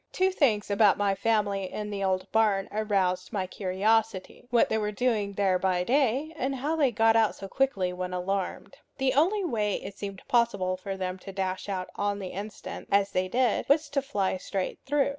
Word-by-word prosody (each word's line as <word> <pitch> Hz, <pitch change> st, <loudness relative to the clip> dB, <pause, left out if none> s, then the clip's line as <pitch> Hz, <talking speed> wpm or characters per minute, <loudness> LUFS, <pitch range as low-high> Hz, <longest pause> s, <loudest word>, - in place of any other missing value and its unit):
Two 375 Hz, +1 st, +2 dB
things 225 Hz, -, +1 dB
about 200 Hz, 0 st, +5 dB
my 200 Hz, -1 st, +2 dB
family 200 Hz, -2 st, 0 dB
in 210 Hz, 0 st, -5 dB
the 200 Hz, -1 st, -3 dB
old 185 Hz, -1 st, 0 dB
barn 210 Hz, -3 st, +2 dB
aroused 195 Hz, -4 st, 0 dB
my 195 Hz, -3 st, -1 dB
curiosity 205 Hz, +4 st, -1 dB
what 240 Hz, -2 st, +4 dB
they 220 Hz, -, 0 dB
were 210 Hz, 0 st, -1 dB
doing 210 Hz, -3 st, 0 dB
there 190 Hz, -2 st, +2 dB
by 180 Hz, -1 st, +1 dB
day, 270 Hz, -, +1 dB
and 270 Hz, -2 st, -2 dB
how 290 Hz, +5 st, -1 dB
they 290 Hz, -4 st, +3 dB
got 225 Hz, 0 st, +3 dB
out 225 Hz, -2 st, +3 dB
so 195 Hz, -, -8 dB
quickly 195 Hz, -7 st, 0 dB
when 180 Hz, 0 st, -4 dB
alarmed. 185 Hz, +1 st, -3 dB, 0.2 s
The 265 Hz, -1 st, +1 dB
only 370 Hz, +8 st, +2 dB
way 215 Hz, -, 0 dB
it 200 Hz, -, -7 dB
seemed 200 Hz, -2 st, -7 dB
possible 200 Hz, -6 st, +2 dB
for 195 Hz, +1 st, -6 dB
them 185 Hz, 0 st, -3 dB
to 195 Hz, -, -9 dB
dash 190 Hz, 0 st, -3 dB
out 185 Hz, -2 st, -3 dB
on 205 Hz, 0 st, 0 dB
the 190 Hz, -2 st, -5 dB
instant, 205 Hz, +4 st, -7 dB
as 200 Hz, 0 st, +3 dB
they 185 Hz, 0 st, 0 dB
did, 245 Hz, +4 st, +1 dB
was 295 Hz, +1 st, +3 dB
to 280 Hz, -1 st, 0 dB
fly 205 Hz, -9 st, -1 dB
straight 190 Hz, 0 st, -4 dB
through. 285 Hz, 0 st, +2 dB
205 Hz, 200 wpm, -28 LUFS, 190-240 Hz, 0.2 s, about